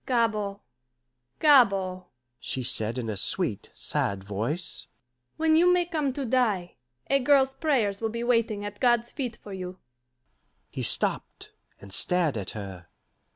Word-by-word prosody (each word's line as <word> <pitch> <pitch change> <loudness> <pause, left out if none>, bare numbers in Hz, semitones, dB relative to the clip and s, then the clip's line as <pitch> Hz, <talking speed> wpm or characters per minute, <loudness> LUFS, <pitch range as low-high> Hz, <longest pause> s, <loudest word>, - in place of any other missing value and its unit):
"Gabord, 215 -5 0 0.8
Gabord," 195 -11 +4 0.3
she 130 - -3
said 115 0 +3
in 120 -3 -3
a 110 - -3
sweet, 95 - 0
sad 100 -1 -1
voice, 115 - -4 0.5
"when 315 0 +3
you 350 +2 +5
may 360 -1 +3
come 310 -5 -1
to 275 0 -4
die, 220 -8 0 0.3
a 275 - +3
girl's 270 0 +3
prayers 235 -11 0
will 225 - -1
be 235 +1 -4
waiting 230 -4 0
at 205 0 -7
God's 240 -1 +2
feet 250 -5 -4
for 205 - -11
you." 185 -1 -6 0.9
He - - -5
stopped, - - -1 0.3
and 100 -1 -8
stared 175 - +2
at 100 -4 -4
her. 95 -4 -8
205 Hz, 145 wpm, -26 LUFS, -, 0.9 s, you